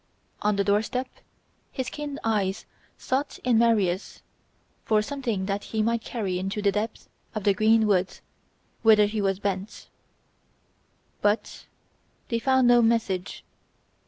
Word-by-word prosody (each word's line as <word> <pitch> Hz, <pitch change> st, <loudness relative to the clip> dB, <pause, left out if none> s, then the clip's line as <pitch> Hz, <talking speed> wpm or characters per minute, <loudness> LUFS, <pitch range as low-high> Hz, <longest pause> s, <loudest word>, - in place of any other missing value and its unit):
On 210 Hz, 0 st, +1 dB
the 200 Hz, -, +1 dB
door 205 Hz, +1 st, +3 dB
step 250 Hz, +4 st, -3 dB, 0.6 s
his 260 Hz, -2 st, -4 dB
keen 295 Hz, -1 st, -5 dB
eyes 205 Hz, -3 st, -1 dB, 0.3 s
sought 270 Hz, +3 st, -2 dB
in 245 Hz, -3 st, +3 dB
Maria's 210 Hz, -5 st, +1 dB, 0.6 s
for 215 Hz, -1 st, +2 dB
something 235 Hz, -7 st, -3 dB
that 200 Hz, +1 st, -3 dB
he 220 Hz, -1 st, -1 dB
might 230 Hz, +1 st, 0 dB
carry 195 Hz, -8 st, -3 dB
into 195 Hz, +3 st, -3 dB
the 200 Hz, -1 st, +2 dB
depth 215 Hz, +2 st, -4 dB, 0.3 s
of 215 Hz, -, -3 dB
the 200 Hz, -, +4 dB
green 220 Hz, +2 st, +3 dB
woods 190 Hz, -3 st, 0 dB, 0.6 s
whither 215 Hz, -2 st, +6 dB
he 210 Hz, +1 st, -2 dB
was 195 Hz, -1 st, +1 dB
bent; 195 Hz, 0 st, -4 dB, 1.3 s
but 205 Hz, +2 st, -1 dB, 0.6 s
they 230 Hz, -, 0 dB
found 260 Hz, +1 st, +3 dB
no 240 Hz, 0 st, +6 dB
message. 225 Hz, -5 st, 0 dB
215 Hz, 135 wpm, -26 LUFS, 200-235 Hz, 1.3 s, whither